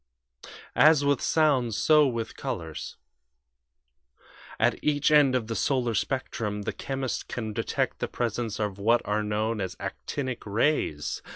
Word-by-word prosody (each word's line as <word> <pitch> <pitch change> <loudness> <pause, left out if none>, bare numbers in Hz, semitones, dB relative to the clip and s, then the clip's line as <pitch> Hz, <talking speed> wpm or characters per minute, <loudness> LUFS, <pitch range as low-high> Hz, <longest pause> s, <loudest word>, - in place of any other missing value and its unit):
"As 155 -2 +6
with 140 -2 +2
sounds, 130 -9 +2
so 150 -2 +5
with 115 -3 -3
colors. 80 -3 -5 1.6
At - - +1
each 150 0 +2
end 145 -4 +5
of 125 -3 0
the 115 +1 -4
solar 125 -3 0
spectrum 105 -4 -2
the - - -3
chemist 135 -2 -4
can 110 -3 -4
detect - - -2
the - - -1
presence 115 -2 -3
of 105 -2 -2
what 115 +4 +3
are 105 +1 0
known 105 +1 -1
as 95 -1 -4
'actinic' 130 -4 -4
rays. 100 - 0
120 Hz, 135 wpm, -27 LUFS, 105-135 Hz, 1.6 s, As